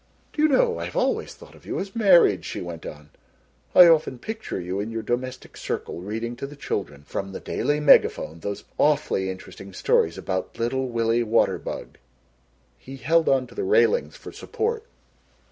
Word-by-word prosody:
"Do 300 - -2
you 310 - +6
know 460 - +2
I - - -3
have - - -8
always - - 0
thought - - -15
of - - -18
you - - -4
as 195 +3 -6
married," 175 - +5
she - - -5
went 85 -2 -7
on; 75 0 -11 0.6
"I 180 - +11
often 160 -6 +3
picture 220 - -5
you 90 +2 -4
in 105 +2 -3
your 115 -1 -4
domestic 130 +3 -4
circle 85 - -5
reading 115 +5 -4
to 140 - -5
the 145 - -11
children 85 - -4
from 95 +6 -5
the - - -5
Daily 145 0 -1
Megaphone 85 - +4
those 100 +4 -5 0.2
awfully 145 -10 +2
interesting 95 +1 -9
stories 85 -2 +1
about 95 -1 -4
Little 130 +3 -1
Willie 115 0 +1
Waterbug." 115 0 -1 0.8
He 135 +1 -10
held 160 +6 +2
on 135 -1 +2
to - - -16
the 410 - -3
railings 465 +4 +2
for - - -10
support. 460 0 -3
125 Hz, 180 wpm, -24 LUFS, -, 0.8 s, I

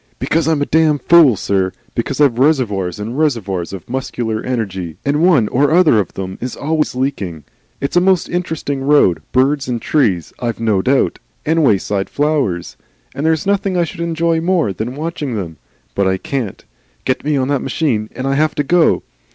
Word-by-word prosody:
"Because 160 -1 0
I'm 155 -3 +2
a - - -1
damned 155 -3 +2
fool, 165 -8 +6
sir. 95 -1 -1 0.2
Because 130 +4 -2
I've 135 -5 +3
reservoirs 105 - +1
and 115 +7 -4
reservoirs 100 - -1
of 95 -4 -8
muscular 120 -3 -3
energy, 95 -9 -3
and 145 +2 +1
one 160 - +4
or 140 +3 +2
other 160 -8 +5
of 95 - -2
them 95 -1 -5
is 125 0 -4
always 155 -2 -1
leaking. 105 - -3 0.4
It's 140 - -3
a 175 - +5
most 185 -1 +2
interesting 160 -5 -3
road, 135 - +3
birds 135 +2 +2
and 120 -2 -2
trees, 110 - 0
I've 120 -2 -3
no 110 -4 +1
doubt, 130 +5 +1 0.3
and 160 +1 +2
wayside 100 -4 +1
flowers, 140 - -1 0.4
and 150 - -2
there's 160 -2 +1
nothing 195 -2 0
I 175 - +3
should 170 +1 -6
enjoy 165 0 0
more 170 - +1
than 110 +7 -4
watching 150 -4 -4
them. 85 -7 -5 0.4
But 100 -1 +1
I 95 0 +1
can't. 120 -1 -4 0.4
Get 130 - -1
me 150 0 0
on 130 -1 0
that 140 -2 +1
machine, 115 -10 -1
and 130 - -4
I 135 - +1
have 155 +2 +1
to 145 - 0
go. 170 +4 +3
135 Hz, 185 wpm, -17 LUFS, 105-155 Hz, 0.4 s, fool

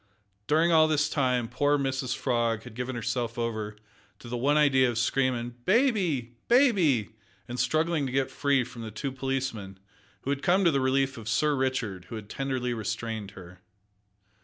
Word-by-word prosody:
During 160 +3 +3
all 160 -1 +6
this 150 -1 +2
time 125 -4 +1
poor 145 +5 +1
Mrs 135 -2 -1
Frog 115 -3 0
had 125 - -11
given 125 +2 -4
herself 120 0 -2
over 110 -3 -3 0.4
to - - -13
the 120 - -4
one 140 +5 +2
idea 130 -4 +4
of 120 - -3
screaming 120 -1 0
"baby! 185 - +1
bai 255 +2 +6
e 145 - +3
by!" 105 - -20 0.3
and 125 +1 -5
struggling 155 -2 +1
to - - -5
get 135 0 0
free 140 -2 +2
from 125 -1 -10
the 110 - -6
two 110 +6 -4
policemen, 130 -7 -3 0.4
who 140 - -2
had 140 -1 -2
come 185 +2 +3
to 170 - +5
the 140 -2 +1
relief 135 -1 +1
of 110 0 -7
Sir 150 +6 +2
Richard, 130 -6 -1
and 90 -1 -14
who 110 +4 -6
tenderly 125 +2 -3
restrained 110 -1 -4
her. 90 0 -12
130 Hz, 185 wpm, -28 LUFS, 115-145 Hz, 0.4 s, all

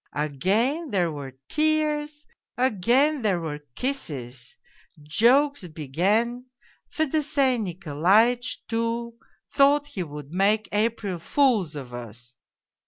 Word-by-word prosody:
Again 205 - 0
there 180 -6 +1
were 135 -3 -8
tears, 300 -1 0 0.3
again 255 +5 +2
there 200 -5 +1
were 155 -3 -5 0.2
kisses. 135 - -5 0.5
Jokes 240 - +3
began. 195 - -1 0.4
Fedosey 285 -4 +1
Nikolaitch, 195 +6 +1
too, 230 +1 -2 0.4
thought 285 +1 +4
he 285 -10 -6
would 150 -3 -7
make 205 +4 +2
April 210 -3 -1
fools 215 - +1
of 130 -4 -8
us. 120 +1 -9
220 Hz, 100 wpm, -25 LUFS, -, 0.5 s, thought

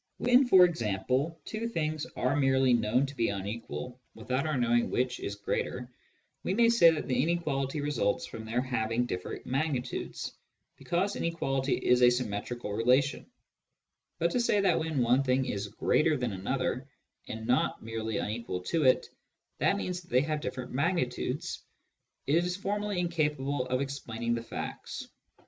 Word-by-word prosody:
When, 250 +2 +4
for 185 -5 +8
example, 130 - -1
two 220 +1 -3
things 155 -7 -2
are 130 +2 +1
merely 135 -2 +3
known 120 +3 +2
to 140 +1 -8
be 115 -3 +1
unequal, 110 +5 -5 0.2
without 130 +6 -2
our 155 -3 0
knowing 120 -1 +2
which 125 0 0
is 100 - -4
greater, 120 +4 -3 0.5
we 185 - -1
may 230 +1 +5
say 230 -8 +7
that 160 -2 -1
the 125 -1 +2
inequality 150 -3 -1
results 145 -9 0
from 110 - -8
their 115 +3 -1
having 120 -2 0
different 90 -6 -5
magnitudes, 130 -2 -2 0.4
because 185 +4 -1
inequality 135 -5 0
is 125 0 +3
a 125 - +8
symmetrical 120 -1 -3
relation; 125 +6 +2 0.9
but - - +1
to 250 - +1
say 235 -3 +3
that 185 -4 +3
when 160 -5 0
one 125 +3 +4
thing 130 0 +1
is 100 -3 -3
greater 150 +8 +2
than 125 -3 -2
another, 130 +7 -2 0.4
and 110 0 -6
not 125 +2 +1
merely 110 -1 -3
unequal 105 -4 -3
to 155 - 0
it, 130 - +4 0.5
that - - +3
means 180 0 -3
that 175 - -21
they 125 - +4
have 150 +1 -2
different 130 -3 -5
magnitudes, 145 0 -1 0.6
is 175 +5 +2
formally 205 0 -2
incapable 150 -6 0
of 130 +1 0
explaining 120 -4 -3
the 115 - -1
facts. 115 - -6
130 Hz, 155 wpm, -30 LUFS, 120-160 Hz, 0.9 s, for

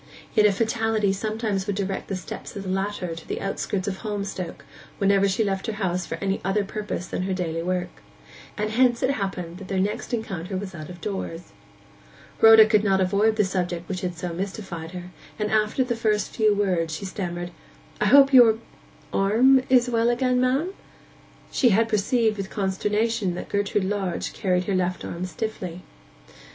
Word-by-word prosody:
Yet 210 -1 +5
a - - +3
fatality 220 -1 +1
sometimes 215 -1 -2
would 205 - -1
direct 195 -1 -3
the 195 - -3
steps 185 - -8
of 200 - -5
the 190 - -5
latter 190 -2 -2
to 165 - -11
the - - -3
outskirts 195 0 -3
of 190 -1 -2
Holmstoke 200 -5 -5 0.3
whenever 200 0 +3
she 195 +4 +1
left 195 +1 -2
her 220 - -1
house 185 -4 -2
for - - -3
any 195 0 -2
other 195 +2 +1
purpose 205 -3 -4
than 180 - -4
her 190 0 -1
daily 165 -3 -2
work; 180 +1 -3 0.6
and 215 0 -1
hence 240 +1 +3
it 260 - +3
happened 190 -7 -4
that 195 - -9
their 190 -1 -1
next 205 +6 -2
encounter 195 -6 -3
was 190 0 -6
out 155 -3 -8
of 175 -1 -10
doors. 180 - -5 0.9
Rhoda 225 -1 +9
could 215 -1 +3
not 195 -2 +3
avoid 200 +4 +2
the 210 -2 +3
subject 175 -2 -2
which 185 -2 -4
had 180 -2 -3
so 175 +1 -4
mystified 185 -3 -5
her, 180 0 -8 0.3
and 210 -1 -2
after 215 +4 +2
the 245 -2 -2
first 215 -3 0
few 215 -1 +4
words 175 -5 0
she 195 - -6
stammered, 175 -2 -4 0.5
'I - - +1
hope 275 0 +7
your—arm 230 +1 +3
is 250 -1 +5
well 230 -1 +2
again, 250 +1 +2
ma'am?' 275 +9 +1 0.8
She 245 - +3
had 225 +2 +3
perceived 220 +1 +1
with 195 -1 -4
consternation 210 0 0
that - - -7
Gertrude 200 0 0
Lodge 190 -3 -2
carried 180 -3 0
her 195 - -2
left 185 -1 -1
arm 175 +2 -4
stiffly. 185 -4 -5
200 Hz, 180 wpm, -24 LUFS, 185-220 Hz, 0.9 s, Rhoda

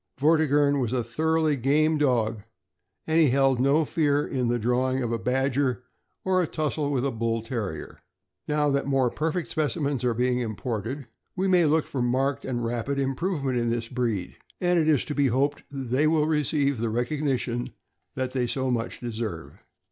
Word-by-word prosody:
Vortigern 145 -1 +3
was 125 -2 -1
a 125 -2 0
thoroughly 160 +5 +1
game 150 +4 +2
dog, 115 -6 +1 0.6
and 160 +1 +2
he 155 -4 +5
held 135 -1 +3
in 130 - +2
no 150 +3 +3
fear 145 -2 +1
the 120 -3 0
drawing 125 +3 0
of 120 - -2
a 115 - -1
badger 130 +2 0 0.4
or 185 -1 +3
a 175 - 0
tussle 150 -2 -2
with 135 -2 0
a 140 - 0
Bull 115 -1 -1
Terrier. 110 - -5 0.5
Now 150 0 +1
that 140 0 0
more 135 -3 +2
perfect 160 +2 -2
specimens 145 -3 -1
are 120 -2 +1
being 125 +1 +1
imported, 115 +4 -4 0.3
we 190 +1 0
may 180 -3 +4
look 155 +1 +2
for 135 - -3
marked 130 +3 0
and 120 -2 -2
rapid 120 +4 -2
improvement 135 -1 -1
in 120 0 0
this 115 -1 -2
breed, 115 -7 -2 0.2
and 175 -1 +2
it 155 - +1
is 150 -5 +3
to 150 - -4
be 145 -1 +2
hoped 140 +4 0
they 135 +1 0
will 155 -1 +3
receive 145 -3 +1
the 115 0 -1
recognition 125 0 -1 0.5
that 130 -1 -2
they 125 -2 0
so 130 +1 -1
much 115 -1 -3
deserve. 110 - -5
135 Hz, 180 wpm, -26 LUFS, 120-150 Hz, 0.6 s, he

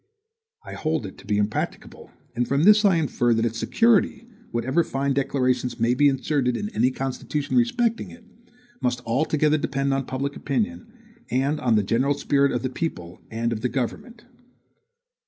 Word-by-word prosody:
I - - -8
hold 155 -6 -2
it 95 - -9
to - - -15
be 105 -1 +1
impracticable; 105 +1 -3 0.3
and 120 +1 0
from 140 +2 +1
this 210 +2 +6
I 195 -4 +5
infer, 120 -7 +1
that 115 +1 +1
its 115 0 -2
security, 230 0 +2 0.2
whatever 130 +8 +1
fine 140 -1 -1
declarations 130 -2 0
may 115 +2 +3
be 145 +3 +4
inserted 135 -2 0
in 210 - -4
any 165 - +2
constitution 135 +3 -3
respecting 240 -2 +1
it, 240 -3 -15 0.6
must 125 0 0
altogether 150 +5 +1
depend 140 -1 -1
on 135 -1 -2
public 140 +2 -3
opinion, 225 - -3 0.4
and 135 +4 0
on 120 -3 +2
the 105 - +3
general 130 +8 +1
spirit 140 0 +2
of - - -2
the 130 - -1
people 90 - -5
and 115 +1 -1
of 110 - -5
the 125 - 0
government. 135 - -4
135 Hz, 170 wpm, -24 LUFS, 120-155 Hz, 0.6 s, this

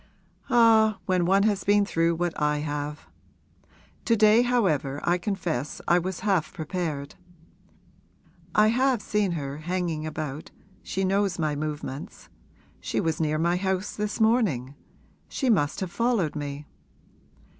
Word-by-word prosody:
'Ah, 225 -4 +5
when 180 -2 +1
one 195 +2 +4
has 205 -3 +1
been 205 0 +3
through 165 -3 +1
what 175 0 -1
I 150 0 +2
have! 150 0 -4 1.0
To 230 - +3
day 215 +1 +5
however 180 - +1
I 175 +1 +1
confess 175 - -3
I 175 - +4
was 185 +1 -4
half 190 -6 +1
prepared. 155 -4 -4 1.4
I 210 0 +5
have 255 +1 +2
seen 205 -3 0
her 140 -3 -4
hanging 170 -2 -2
about 155 -1 -5 0.3
she 195 - -3
knows 195 -1 +1
my 155 -3 -1
movements. 150 -2 -6 0.5
She - - -2
was 160 0 -1
near 155 -1 +1
my 170 +3 +1
house 190 +1 -2
this 210 +1 -3
morning 210 - +2 0.6
she 265 -4 0
must 145 -7 +1
have 185 -2 -3
followed 230 -10 0
me.' 145 0 -5
175 Hz, 135 wpm, -26 LUFS, 150-210 Hz, 1.4 s, Ah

